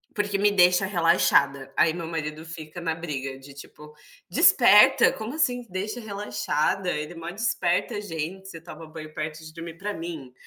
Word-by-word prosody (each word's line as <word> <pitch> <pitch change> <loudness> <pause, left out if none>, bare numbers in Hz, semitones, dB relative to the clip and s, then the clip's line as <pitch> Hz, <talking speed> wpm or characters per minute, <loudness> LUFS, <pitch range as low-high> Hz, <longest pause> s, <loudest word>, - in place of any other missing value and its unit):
Porque 205 -1 -1
me 205 +1 +3
deixa 180 -1 +4
relaxada, 140 -7 +2
aí 160 0 +4
meu 170 -2 -6
marido 155 -1 -5
fica 160 0 -8
na 165 -1 -2
briga 140 -5 -5
de, 135 +1 -14
tipo: 150 +2 -13 0.4
"Desperta, - - +6
como 225 +7 -6
assim, 245 -6 0
"deixa 200 +6 -4
relaxada", 200 -4 -2
ele 150 +1 -3
mó 165 +1 -7
desperta 200 -1 -1
gente, 185 +1 -6
você 165 -4 -9
toma 165 -1 -11
banho 155 -1 -10
perto 155 0 -5
de 155 0 -11
dormir", 165 0 -9
para 205 +2 -4
mim 160 -6 -7
170 Hz, 165 wpm, -25 LUFS, 155-195 Hz, 0.4 s, Desperta